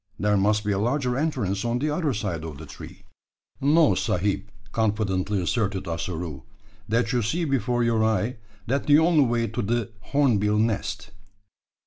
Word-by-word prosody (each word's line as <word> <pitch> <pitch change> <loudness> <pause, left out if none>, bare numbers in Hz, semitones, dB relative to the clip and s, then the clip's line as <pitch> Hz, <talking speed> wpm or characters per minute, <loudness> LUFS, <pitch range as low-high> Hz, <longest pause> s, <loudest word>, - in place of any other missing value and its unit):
There 105 +1 +2
must 105 +2 +2
be 105 - +1
a 95 - 0
larger 125 +3 0
entrance 125 - -1
on 120 0 0
the 150 +4 -1
other 150 -1 0
side 100 -8 -3
of 80 -3 -7
the 80 - -9
tree." - - -11 0.6
"No, 145 -4 +5
sahib," 100 +2 -1 0.2
confidently 105 -3 0
asserted 100 +1 -1
Ossaroo; 85 -3 -4 0.5
"that 115 +2 +1
you 125 - +2
see 165 +11 -1
before 125 -4 0
your 115 -2 +2
eye 110 +2 0 0.3
that 135 +4 -1
the 145 0 +7
only 160 -3 +4
way 120 -1 +1
to 110 +3 -3
de 115 +1 -1 0.2
horneebill 105 -8 +2
nest." 110 -1 -1
110 Hz, 160 wpm, -25 LUFS, 100-125 Hz, 0.6 s, the